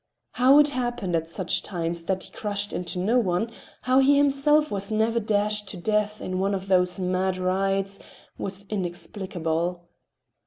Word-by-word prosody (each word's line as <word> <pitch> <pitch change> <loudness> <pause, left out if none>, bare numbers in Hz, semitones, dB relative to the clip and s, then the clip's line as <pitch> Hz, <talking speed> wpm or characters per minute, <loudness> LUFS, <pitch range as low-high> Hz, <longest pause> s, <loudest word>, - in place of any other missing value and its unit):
How 260 +3 +5
it 295 0 +6
happened 240 -9 -2
at 165 0 -1
such 180 +1 0
times 170 -2 -3
that 190 0 -1
he - - -12
crushed 205 -1 -3 0.2
no 215 +8 +2
one, 200 +1 0 0.3
how 255 +1 +4
he 280 +1 +5
himself 290 +2 +3
was 200 -1 -2
never 220 +2 +1
dashed 210 -1 0
to 190 - -6
death 210 +3 0
in 185 0 -3
one 195 +1 +1
of 190 0 -5
these 180 0 +3
mad 185 0 0
rides, 195 +1 0 0.4
was 195 +1 -3
inexplicable. 175 -2 -3
195 Hz, 155 wpm, -25 LUFS, 185-220 Hz, 0.4 s, it